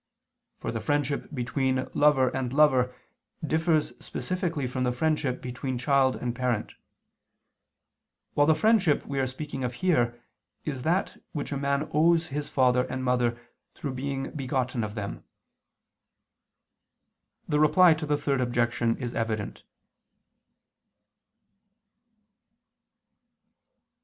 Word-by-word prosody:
For - - -4
the - - -3
friendship 145 -1 -1
between 130 0 -1
lover 145 -3 +4
and 130 -1 -3
lover 130 -3 +4 0.5
differs 160 0 +1
specifically 175 -6 -2
from 125 +1 -2
the 125 - +1
friendship 145 -1 -1
between 125 +1 -4
child 130 +1 +3
and 120 -1 -3
parent: 125 -3 -1 1.6
while 145 0 +3
the 160 - +5
friendship 195 -3 +3
we 140 -1 -3
are 130 - +1
speaking 135 0 -5
of 125 0 -2
here, 120 -10 +1 0.5
is 135 -4 -3
that 175 +8 -1
which 145 -2 -4
a 140 - -1
man 140 +2 0
owes 165 +2 +4
his 145 0 -3
father 125 -1 +3
and 130 - -4
mother 125 -2 +1 0.4
through 140 -3 -4
being 135 +1 -3
begotten 130 -4 -2
of 105 0 -5
them. 100 -2 -5 2.2
The 150 - +1
Reply 170 +3 +6
to 155 0 -4
the 145 0 +2
Third 140 -2 0
Objection 120 -1 +1
is 120 -3 -4
evident. 110 -2 -3
135 Hz, 115 wpm, -27 LUFS, 125-150 Hz, 2.2 s, Reply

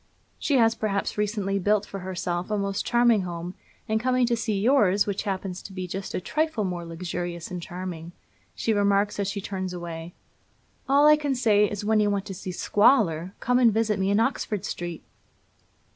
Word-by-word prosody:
She 285 - +2
has, 225 -2 +4
perhaps, 215 -3 -2
recently 205 -2 -1
built 205 +2 +2
for 195 - -7
herself 180 -1 -3
a 210 - 0
most 200 0 -1
charming 240 -3 +3
home, 175 0 -5 0.3
and 220 0 +1
coming 255 +1 +2
to 235 0 +1
see 220 -3 -1
yours, 205 -4 +3
which 200 -1 -2
happens 190 -1 -4
to 195 - -10
be 185 -1 -4
just 190 +2 -5
a - - 0
trifle 305 - -1
more 180 -3 -3
luxurious 170 +1 -5
and 180 -1 -4
charming, 175 -1 -6 0.4
she 225 - 0
remarks 205 0 +2
as 200 - 0
she 200 0 -3
turns 190 -2 -4
away: 170 -1 -7 0.7
'All 285 +2 +5
I 300 0 +7
can 290 -3 -1
say 210 -4 +3
is, 205 0 -5
when 220 0 +3
you 210 -1 +3
want 200 -1 -1
to 195 - -6
see 185 0 -6
squalor, 190 - +2
come 250 +1 +2
and 240 -3 +6
visit 215 -1 0
me 190 0 +1
in 205 +1 +3
Oxford 220 -4 -1
Street!' 175 -2 -5
200 Hz, 190 wpm, -26 LUFS, 180-220 Hz, 0.7 s, I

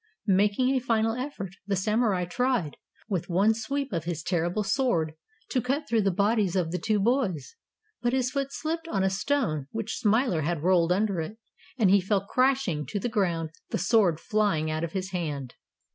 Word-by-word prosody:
Making 205 +5 +3
a 265 - +2
final 225 -3 +1
effort, 240 -8 -5
the 200 - +1
Samurai 210 -1 +1
tried, 240 - 0 0.3
with 190 -6 -2
one 195 +5 +4
sweep 270 +3 -3
of 165 -2 -2
his 165 -2 -3
terrible 175 +3 0
sword, 195 - +1 0.4
to 255 - +1
cut 275 +5 -1
through 230 -2 +2
the 200 - +2
bodies 200 0 +1
of 175 -3 0
the 180 - -2
two 215 -2 +1
boys. 220 - 0 0.5
But 240 - +1
his 255 -1 +1
foot 275 0 -1
slipped 325 +3 -3
on 195 -11 0
a 190 - +2
stone 190 - 0
which 225 -1 -4
Smiler 220 - +2
had 160 0 -2
rolled 175 -1 +3
under 195 -1 +1
it, 185 +8 -6 0.4
and 210 -6 +4
he 200 0 +5
fell 195 +1 0
crashing 255 - +1
to 205 - -3
the 240 - -2
ground, 170 -8 0 0.2
the - - -1
sword 190 -4 +3
flying 195 -8 0
out 155 +1 -2
of 170 - -4
his 190 -1 -3
hand. 145 -8 -3
200 Hz, 190 wpm, -27 LUFS, 175-240 Hz, 0.5 s, he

